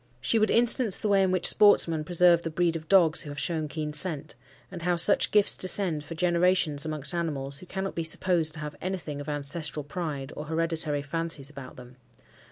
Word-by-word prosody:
She 225 - +1
would 215 - +1
instance 235 -2 +2
the 210 - -3
way 200 -1 +3
in 190 - +2
which 185 -1 -1
sportsmen 165 -6 +4
preserve 175 0 +3
the 165 - -5
breed 170 +1 -1
of 160 -1 -8
dogs 170 -5 +4
who 150 - -8
have 145 - -9
shown 155 +1 -2
keen 150 +1 -5
scent; 150 -1 -3 0.4
and 180 -3 -8
how 175 +1 0
such 175 +4 +5
gifts 210 -1 +3
descend 185 -5 +1
for 165 +2 -9
generations 170 -3 0
amongst 150 -1 -4
animals, 140 -5 -3
who 180 - -13
cannot 190 +1 -5
be 165 - -3
supposed 160 -1 +2
to 155 - -9
have 150 -1 -7
anything 170 -6 -5
of 145 - -8
ancestral 150 0 -3
pride, 145 -2 -6
or 150 - -7
hereditary 160 -2 -1
fancies 150 -1 -4
about 135 -3 -11
them. 125 0 -14
165 Hz, 200 wpm, -26 LUFS, 150-180 Hz, 0.4 s, such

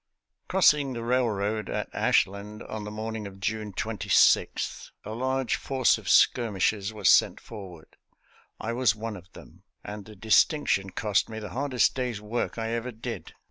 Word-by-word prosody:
Crossing 150 -7 +3
the 115 -1 -5
railroad 110 -4 0
at - - -2
Ashland 100 +2 0
on 110 -1 -6
the - - -5
morn 110 +1 -5
ing 105 -2 -6
of 95 -1 -12
June 105 +1 -3
26, 110 +1 +1
a - - -6
large 130 +2 -1
force 130 -3 +2
of - - -7
skirmishers 105 -3 +3
was 105 -4 -1
sent - - +5
forward. 95 -7 -11 0.6
I 115 +1 -3
was 120 -3 +2
one 110 0 -5
of 90 0 -13
them, - - -15 0.2
and 105 -1 -7
the 110 - -12
dis 110 +2 +5
tinction 145 - -1
cost 105 -1 +1
me 110 - -7
the 105 -2 -6
hardest 130 +3 +1
day's 125 -5 -3
work 105 +4 -3
I 115 0 -2
ever 115 +2 -3
did. 110 -1 -7
110 Hz, 170 wpm, -27 LUFS, 105-120 Hz, 0.6 s, sent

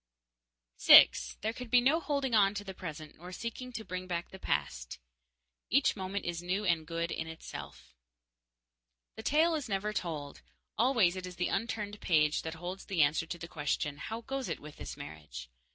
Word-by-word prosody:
6. - - +7
There 220 +2 -1
can 250 +1 -7
be 245 +2 +6
no 275 +7 +3
holding 280 -6 -1
on 205 -2 +5
to 205 - -3
the 195 -1 -7
present 155 -4 -8
nor 180 +3 -10
seeking 235 +5 -5
to 220 -1 -5
bring 185 0 -5
back 175 -1 -3
the 190 - -10
past. - - -2 0.7
Each 275 +4 +3
moment 195 0 -4
is 175 -1 -2
new 185 +4 -1
and 165 -4 +1
good 170 +1 -2
in 165 - -3
itself. 160 0 -9 1.2
The 220 - -7
tale 315 +7 +3
is 295 -7 -2
never 205 +2 -1
told. 155 -7 -4 0.3
Always 230 -7 +3
it 185 -1 -5
is 180 - -9
the 180 +1 -1
unturned 210 -1 -3
page 150 -3 +3
the 160 0 -6
holds 180 +3 -6
the 180 -6 +3
answer 150 +3 +1
to 175 - -5
the 170 - -7
question, 150 -2 -2
"How 225 +10 -5
goes 270 +2 -4
it - - -3
with 150 0 -11
this 70 -2 -7
marriage?" 75 -5 -9
185 Hz, 185 wpm, -32 LUFS, 160-220 Hz, 1.2 s, 6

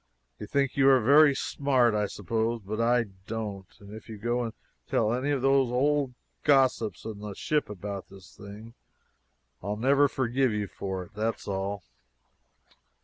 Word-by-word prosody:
You 105 - -7
think 140 +2 0
you 135 0 +5
are 135 -1 +6
very 140 +4 +6
smart, 130 -5 +1
I 105 -1 0
suppose, 115 +4 -2
but 110 +3 -3
I 120 +1 +3 0.2
don't. 105 -4 -5
And 100 0 -12
if 110 +1 -11
you 110 - -7
go 120 +3 -1
and 115 -1 -4 0.3
tell 110 +1 +1
any 130 +4 -1
of 140 -3 0
those 135 -2 +3
old 135 +1 +1 0.3
gossips 130 - +2
in 110 -2 -6
the 105 -1 -7
ship 150 +3 -1
about 100 -1 -6
this 95 -2 -15
thing, 105 +3 -11 0.9
I'll 105 +2 -3
never 140 +5 +4
forgive 130 -2 0
you 105 -1 -1
for 95 -1 -5
it; 90 - -17
that's 110 +2 -3
all." 100 -1 -3
115 Hz, 165 wpm, -28 LUFS, 105-135 Hz, 0.9 s, are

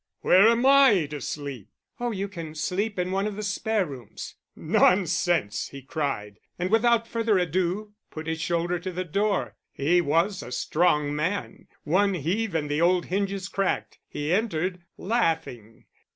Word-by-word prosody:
Where 190 +4 +6
am 235 +2 +3
I 270 - +6
to 145 -2 -5
sleep?" 140 -6 -6 0.3
"Oh, 240 0 -1
you 200 -3 -3
can 165 -5 -8
sleep 195 +7 -2
in 180 0 -1
one 195 +2 0
of 210 - -4
the 210 - -5
spare 210 0 0
rooms." 130 -8 -9 0.2
"Nonsense!" 175 - +2
he 140 -1 -10
cried; 130 -9 -3 0.2
and 180 +2 -2
without 230 0 +3
further 230 -3 +1
ado 185 +4 -1 0.2
put 155 0 -7
his 160 0 -3
shoulder 175 +1 0
to 185 +2 -5
the 185 +1 -4
door: 200 +4 -1
he 170 +6 +2
was 170 +5 +1
a 125 - -9
strong 150 +2 +1
man; 180 +7 -3 0.2
one 195 +5 +2
heave 180 +5 -1
and 150 -2 0
the 145 +2 -1
old 175 +1 +3
hinges 195 0 -1
cracked. 195 -1 -2
He 150 +3 -2
entered, 185 -3 -1 0.2
laughing. 160 - -2
180 Hz, 160 wpm, -26 LUFS, 155-200 Hz, 0.3 s, Where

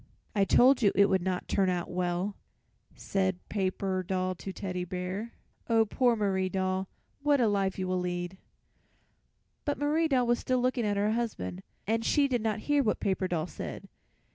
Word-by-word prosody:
"I 200 -2 +3
told 255 +6 +5
you 205 -3 +5
it 200 +1 +5
would 190 -2 +2
not 180 0 -2
turn 195 -2 +2
out 175 -1 -1
well," 180 +2 -1 0.6
said 190 -2 -1
Paper 190 -1 -1
Doll 185 0 -1
to 190 +2 -7
Teddy 180 -2 -4
Bear. 185 +5 -4 0.4
"Oh, 225 -1 +4
poor 240 +2 +2
Marie 190 -3 0
Doll, 190 0 -1 0.3
what 290 -1 +3
a 235 - +4
life 195 -2 0
you 185 -1 -2
will 185 0 0
lead!" 175 +1 -3 1.2
But 290 - -1
Marie 305 +3 +2
Doll 260 -4 +2
was 240 0 +2
still 255 -1 0
looking 250 -2 +1
at 205 -1 0
her 205 +1 +2
husband, 150 - -3 0.2
and 225 +2 0
she 285 +4 +3
did 245 -4 0
not 220 -1 -1
hear 290 +2 +2
what 220 -5 0
Paper 190 -1 0
Doll 165 -3 -1
said. - - -7
195 Hz, 180 wpm, -29 LUFS, 185-235 Hz, 1.2 s, told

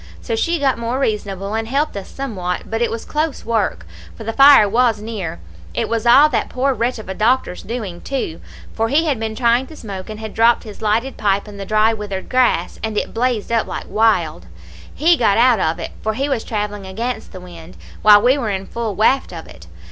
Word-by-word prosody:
So 230 - -3
she 335 +9 0
got 270 -5 +1
more 235 +2 -2
reasonable, 205 -5 -2
and 225 0 -2
helped 280 +3 -1
us 200 -1 -6
somewhat, 190 -10 -4
but 225 +1 -1
it 235 - +2
was 230 - -5
close 305 -1 -2
work, 210 - -1 0.3
for - - -8
the 225 +1 -3
fire 275 -5 +7
was 230 +1 +2
near. 210 - -5 0.4
It - - 0
was 230 0 -1
all 275 +5 +8
that - - -1
poor 270 +2 0
wretch 245 +1 -1
of 220 - -10
a 190 - -4
doctor's 215 -2 0
doing, 210 -7 -6
too, 260 -12 -4 0.3
for 225 0 -1
he 305 +6 +2
had 280 -7 0
been 220 -1 -3
trying 240 +2 +2
to 315 - -12
smoke, 195 -7 -8
and 215 0 -7
had 220 -1 -7
dropped 230 +1 +3
his 215 -3 -11
lighted 225 +5 0
pipe 200 0 0
in 205 -1 -10
the 195 -1 -7
dry 215 +1 +3
withered 205 -3 -6
grass, 250 -9 +1
and 220 -1 -3
it - - -2
blazed 235 -2 -1
up 230 -1 +1
like - - -5
wild; 175 - +1 0.4
he 335 +4 +3
got 220 -8 +2
out 240 -2 +4
of 160 -2 0
it, - - -6
for 220 0 -2
he 275 +4 -1
was 265 -6 -1
travelling 205 -2 -4
against 230 +6 -4
the 185 - -9
wind, 175 -1 -12 0.2
while 210 0 +7
we 260 +4 +4
were 230 -5 -2
in 195 -1 -3
full 225 -2 -4
waft 260 +4 +2
of 165 -2 -8
it. 80 0 -14
225 Hz, 225 wpm, -19 LUFS, 200-250 Hz, 0.4 s, all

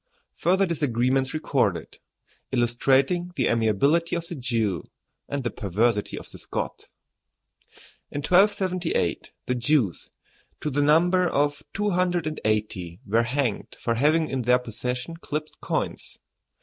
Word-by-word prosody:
FURTHER 190 +4 +2
DISAGREEMENTS 135 -5 +1
RECORDED: 135 - -1 0.5
ILLUSTRATING 135 +8 +2
THE 130 - +1
AMIABILITY 130 - +2
OF 170 -1 -3
THE - - -4
JEW 115 - -1 0.5
AND 140 -1 -2
THE 120 - -1
PERVERSITY 105 +1 0
OF - - -8
THE - - -9
SCOT. - - -5 1.2
In 145 - -4
1278 185 - +2
the 125 - 0
Jews, 125 - +1 0.5
to 150 - -3
the 145 +2 +1
number 175 +5 +4
of 145 -2 0
two 210 0 -1
hundred 175 -2 +1
and 155 0 -4
eighty, 100 -5 -1
were 110 +3 +3
hanged 120 -2 -2
for 115 - 0
having 155 +6 +3
in 135 -3 -2
their 125 +1 +4
possession 125 +5 -4
clipped 155 -2 -5
coins. - - -3
135 Hz, 130 wpm, -25 LUFS, 115-165 Hz, 1.2 s, number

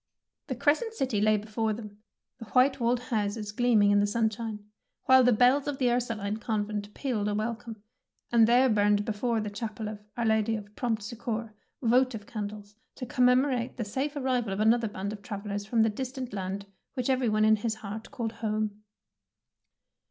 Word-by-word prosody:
The 260 - -3
Crescent 310 - +1
City 255 - 0
lay 215 0 +4
before 215 +1 -2
them, 210 -2 -9 0.4
the 230 - -8
white 255 +5 +3
walled 240 +1 +2
houses 210 -3 -2
gleaming 215 -3 +4
in 205 - +5
the 205 - +3
sunshine, 220 -1 -2 0.4
while 260 0 +6
the 250 - +5
bells 250 +5 +4
of 290 -2 -2
the 250 -2 +2
Ursuline 220 -4 -1
Convent 210 -2 -3
pealed 230 -7 -1
a 205 - 0
welcome, 220 0 -4 0.5
and 230 -2 +6
there 250 +3 +5
burned 205 -2 +3
before 225 +1 0
the 210 -1 -4
chapel 215 0 -5
of 210 -1 -6
'' - - -39
Our 235 - 0
Lady 220 0 +2
of 210 -1 -8
Prompt 225 -4 -1
Succour 225 0 -4 0.3
votive 245 -2 +2
candles, 205 -1 -6 0.2
to 255 - -5
commemorate 250 0 +2
the 230 - -2
safe 270 +8 -2
arrival 255 -6 0
of 195 - -3
another 225 +2 +3
band 200 0 -4
of 210 - -9
travellers 205 -1 -5
from 225 0 +3
the 225 - +3
distant 255 +1 -5
land 195 0 -4 0.3
which 250 -2 -2
every 260 -3 +2
one 215 0 +3
in 220 0 +5
his 220 +1 -2
heart 215 +1 -7
called 230 -2 -4
''home.' 215 -1 -2
220 Hz, 180 wpm, -28 LUFS, 210-245 Hz, 0.5 s, while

